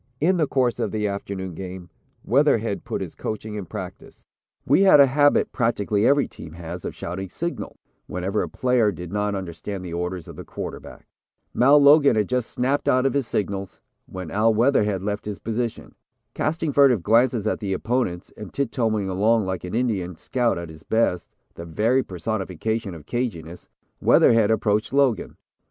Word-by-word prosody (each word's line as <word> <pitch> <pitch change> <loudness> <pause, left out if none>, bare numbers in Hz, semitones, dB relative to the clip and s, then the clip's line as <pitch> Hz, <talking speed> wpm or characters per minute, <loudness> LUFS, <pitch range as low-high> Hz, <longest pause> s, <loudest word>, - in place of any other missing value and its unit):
In 180 +5 +2
the 155 -3 +2
course 125 -3 +1
of - - 0
the 105 -1 -1
afternoon 100 -2 -5
game, 90 0 -8 0.3
Weatherhead - - +2
put - - -4
his - - -5
coaching 110 0 -5
in 105 -4 -5
practice. - - -9 0.4
"We 145 +8 +4
had 190 -7 +7
a 140 - +9
habit 145 +2 +3
practically 105 -3 +1
every 140 0 +3
team 80 - -11
has 85 +1 -7
of - - -5
shouting 95 +2 -5
'Signal' 170 - -5 0.3
whenever 95 +3 -2
a - - -3
player 125 -4 +2
did 90 +1 -8
not 105 0 0
understand 95 +1 -6
the 85 - -6
orders 90 0 -4
of - - -10
the - - -7
quarterback. - - -8 0.5
Mal 140 +4 +6
Logan 145 -1 +6
had 105 -2 +1
just 125 -2 -1
snapped 135 +3 0
out 130 +1 +3
his 140 -4 0
signals, 100 -3 -3 0.3
when 95 -3 -7
Al 110 +3 +3
Weatherhead 105 -5 +2
left 105 0 -3
his 105 -2 -4
position. 115 +1 -4 0.4
Casting 155 -1 -1
furtive 130 -9 +4
glances 115 +1 +3
at 110 - 0
the 100 -3 -3
opponents, 100 -4 -2
and 105 -3 -9
tip 140 -4 -2
toeing 110 -4 0
along 105 +3 +2
like 95 -1 -3
an 90 +3 -5
Indian 100 -8 -1
scout 120 +6 -1
at 85 -1 -6
his 80 -1 -12
best, 100 -3 0 0.2
the 85 - -9
very 110 +10 +1
personification 100 +1 -3
of 75 -3 -12
'caginess,' 90 -9 -4 0.3
Weatherhead 115 -3 +5
approached 110 +1 +1
Logan. 135 -5 +1
105 Hz, 175 wpm, -23 LUFS, 95-125 Hz, 0.5 s, a